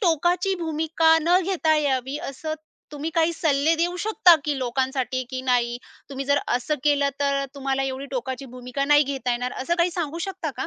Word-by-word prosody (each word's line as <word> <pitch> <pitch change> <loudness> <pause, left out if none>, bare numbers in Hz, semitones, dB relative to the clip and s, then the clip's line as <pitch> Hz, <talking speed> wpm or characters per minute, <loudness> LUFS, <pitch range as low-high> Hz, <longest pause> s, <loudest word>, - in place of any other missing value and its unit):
टोकाची 355 +1 +2
भूमिका 320 +1 +2
न 350 +3 +4
घेता 335 -4 +1
यावी, 270 -2 0
असं 310 0 -5 0.4
तुम्ही 300 +3 -4
काही 330 0 +3
सल्ले 315 -1 +2
देऊ 350 +2 0
शकता 370 -4 +5
की 290 -2 -1
लोकांसाठी, 260 0 -1
की 255 0 -3
नाही, 240 -2 +1 0.3
तुम्ही 275 0 -4
जर 285 +1 +2
असं 250 +5 0
केलं, 285 -1 +3
तर 280 0 +2
अ, - - -2
तुम्हाला 270 -1 -1
एवढी 270 +1 -4
टोकाची 260 +1 -4
भूमिका 250 +2 -3
नाही 295 +1 +5
घेता 270 -2 -3
येणार, 245 +1 -2
असं 340 +5 0
काही 345 +1 +3
सांगू 335 -2 -3
शकता 360 -5 -4
का? 265 - -3
285 Hz, 185 wpm, -24 LUFS, 265-325 Hz, 0.4 s, शकता